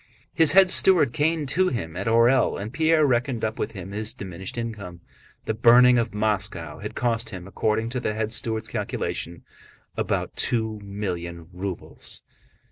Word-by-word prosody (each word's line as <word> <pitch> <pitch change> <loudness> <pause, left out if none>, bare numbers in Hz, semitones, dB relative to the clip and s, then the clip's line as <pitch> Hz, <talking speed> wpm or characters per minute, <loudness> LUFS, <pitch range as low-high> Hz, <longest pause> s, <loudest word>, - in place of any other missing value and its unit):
His 160 -2 +6
head 190 -1 +6
steward 170 -10 +5
came 155 0 0
to 185 +7 +1
him 90 - -4
at 95 +3 -4
Orël 115 +2 +3
and 105 +4 -6
Pierre 160 0 +3
reckoned 125 -2 0
up 110 0 -4
with - - -3
him 95 -2 -8
his 105 +1 -2
diminished 95 +2 -7
income. 100 -7 -6 0.4
The 110 - -1
burning 120 +2 +6
of 115 - -1
Moscow 95 -7 -2
had - - -7
cost 115 -1 0
him, 90 -1 -8
according 110 +3 -1
to 125 +1 -3
the 105 -3 -2
head 110 0 -2
steward's 110 -1 -2
calculation, 85 +1 -4 0.5
about - - -2
two 110 -2 0
million 85 -5 -5
rubles. 95 0 -6
110 Hz, 160 wpm, -24 LUFS, 100-125 Hz, 0.5 s, His